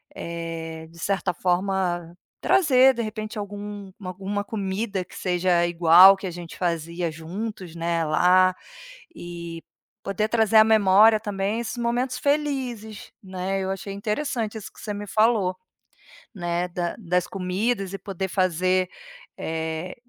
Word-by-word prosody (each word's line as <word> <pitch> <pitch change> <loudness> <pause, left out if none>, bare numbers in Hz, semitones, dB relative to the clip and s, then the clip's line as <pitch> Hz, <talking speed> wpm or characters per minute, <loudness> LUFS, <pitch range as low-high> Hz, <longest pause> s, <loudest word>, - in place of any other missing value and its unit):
eh, 165 -1 -6
de 170 - -16
certa 195 0 -1
forma 180 -2 -1 0.2
trazer 265 -7 +5
de 235 - -3
repente 215 0 -5
algum 205 -1 -7
alguma 195 +2 -3
comida 200 -1 -3
que - - -16
seja 180 -1 +2
igual 175 +3 +8
que 195 - -5
a 180 - -4
gente 170 -1 -9
fazia 170 0 -2
juntos, 180 +2 -6
né, 170 0 0
lá, 185 +4 +4 0.6
e 170 -1 -8 0.4
poder 200 +2 -1
trazer 220 -1 +3
à 215 - +10
memória 215 0 +6
também 205 0 -2
esses 230 +1 -5
momentos 245 +2 -1
felizes, 265 -7 -2
né. 190 +1 -3
Eu 190 - -2
achei 195 +1 -5
interessante 220 +1 -2
isso 215 - -8
que - - -15
você 210 - -4
me 205 0 -6
falou, 215 -4 +2 0.8
né, 175 -1 -1
da 175 -1 -3
das 180 -2 0
comidas 195 +2 -2
e 195 - -5
poder 190 -1 -4
fazer, 185 0 +1 0.5
eh, 160 +2 -4
190 Hz, 135 wpm, -24 LUFS, 175-215 Hz, 0.8 s, à